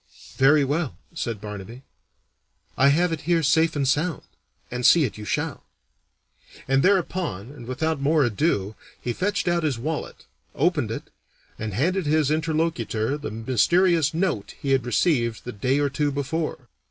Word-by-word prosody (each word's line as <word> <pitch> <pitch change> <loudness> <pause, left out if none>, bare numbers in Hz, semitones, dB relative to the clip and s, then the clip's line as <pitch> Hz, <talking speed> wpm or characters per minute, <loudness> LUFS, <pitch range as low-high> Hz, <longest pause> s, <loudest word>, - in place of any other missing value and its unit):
"Very 145 +2 +5
well," 145 - -2 0.2
said 115 -9 -3
Barnaby; 105 +4 -8 0.9
"I 135 - +4
have 165 +5 +3
it 160 -2 -3
here 170 -2 +3
safe 160 +3 +3
and 140 -2 0
sound, 150 +5 0 0.5
and 125 0 -3
see 165 +5 +6
it 125 - -2
you 105 - -8
shall." - - -2 1.0
And 135 +1 +3
thereupon 175 - 0
and 125 -5 -11
without 155 +3 -1
more 150 +1 +3
ado 110 - 0 0.3
he 120 - -3
fetched 185 - -1
out 175 0 +2
his 150 -6 0
wallet, 155 +6 -5 0.3
opened 150 -6 +1
it, 115 - -6 0.5
and 110 -3 -4
handed 175 - 0
his 150 -1 +2
interlocutor 155 -7 0
the 145 0 -5
mysterious 155 - +2
note 165 - -2
he 140 - -2
had 130 -2 +2
received 120 -3 +1
the 125 - -5
day 130 +5 0
or 145 0 +2
two 145 +1 0
before. 140 -1 -3
145 Hz, 155 wpm, -24 LUFS, 120-160 Hz, 1.0 s, see